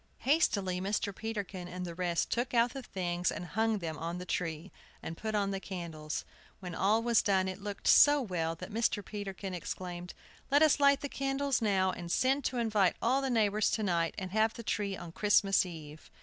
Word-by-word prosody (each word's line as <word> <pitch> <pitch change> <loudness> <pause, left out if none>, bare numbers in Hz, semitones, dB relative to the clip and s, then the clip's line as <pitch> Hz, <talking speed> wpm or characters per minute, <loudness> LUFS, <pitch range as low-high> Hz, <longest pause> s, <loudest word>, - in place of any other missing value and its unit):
Hastily 200 - +2
Mr. 200 0 -1
Peterkin 200 -5 -5
and 180 0 -5
the 170 - -6
rest 175 -1 -1
took 240 +1 -1
out 235 0 +3
the 270 - -5
things 175 -5 -2
and 175 - -5
hung 220 +5 0
them 160 -5 -5
on 170 +1 -3
the 180 - -6
tree, 165 0 -3 0.3
and 165 - -5
put 220 +4 -3
on 200 -1 +1
the 195 - -2
candles. 165 -5 -5 0.3
When 180 -3 -7
all 210 +6 +2
was 235 -2 +4
done, 190 -2 +2
it 190 +1 -5
looked 205 -1 -5
so 290 0 +7
well 170 -9 -2
that 180 +4 -9
Mr. 220 -2 0
Peterkin 195 -2 -6
exclaimed: 180 0 -6 0.3
"Let 285 +2 +5
us 305 -2 +4
light 280 0 +5
the 285 - -2
candles 275 -1 -1
now, 190 -3 +2
and 170 -1 -6
send 270 +6 +2
to 255 - -1
invite 215 -5 +2
all 260 +4 +2
the 270 - -1
neighbors 215 -3 +2
to 220 - -1
night, 170 -4 0
and 185 -1 -5
have 220 +2 +2
the 235 - -7
tree 200 -3 -2
on 170 -1 -8
Christmas 195 0 +3
Eve!" 155 -3 -10
195 Hz, 205 wpm, -31 LUFS, 180-225 Hz, 0.3 s, so